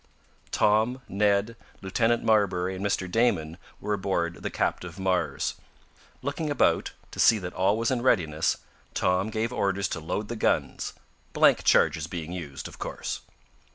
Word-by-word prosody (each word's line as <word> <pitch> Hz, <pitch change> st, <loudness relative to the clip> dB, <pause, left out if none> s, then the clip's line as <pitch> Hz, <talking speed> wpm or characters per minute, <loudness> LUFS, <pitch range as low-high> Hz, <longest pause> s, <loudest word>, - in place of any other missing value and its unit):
Tom, 110 Hz, +5 st, +2 dB
Ned, 100 Hz, +3 st, +1 dB, 0.3 s
Lieutenant 115 Hz, +5 st, +1 dB
Marbury 95 Hz, -4 st, +2 dB
and 95 Hz, -, -5 dB
Mr. 100 Hz, -2 st, 0 dB
Damon 90 Hz, -6 st, +1 dB, 0.2 s
were 105 Hz, +1 st, -2 dB
aboard 95 Hz, -4 st, -1 dB
the -, -, -2 dB
captive 90 Hz, -2 st, -2 dB
Mars. 95 Hz, -3 st, 0 dB, 0.7 s
Looking 145 Hz, +3 st, -2 dB
about, 145 Hz, -, +2 dB, 0.2 s
to -, -, -9 dB
see 115 Hz, -, +6 dB
that 90 Hz, -3 st, -6 dB
all 95 Hz, +3 st, +2 dB
was 115 Hz, +2 st, 0 dB
in 125 Hz, -2 st, 0 dB
readiness, 80 Hz, -11 st, +2 dB, 0.4 s
Tom 90 Hz, +3 st, +1 dB
gave 110 Hz, +2 st, -2 dB
orders 100 Hz, -3 st, 0 dB
to 80 Hz, -, -3 dB
load 100 Hz, +7 st, -3 dB
the 120 Hz, -, -4 dB
guns, 110 Hz, -, 0 dB, 0.4 s
blank -, -, +5 dB
charges 80 Hz, -1 st, +3 dB
being 85 Hz, -1 st, -5 dB
used, 75 Hz, -7 st, -6 dB
of -, -, -13 dB
course. -, -, -4 dB
100 Hz, 150 wpm, -27 LUFS, 90-110 Hz, 0.7 s, see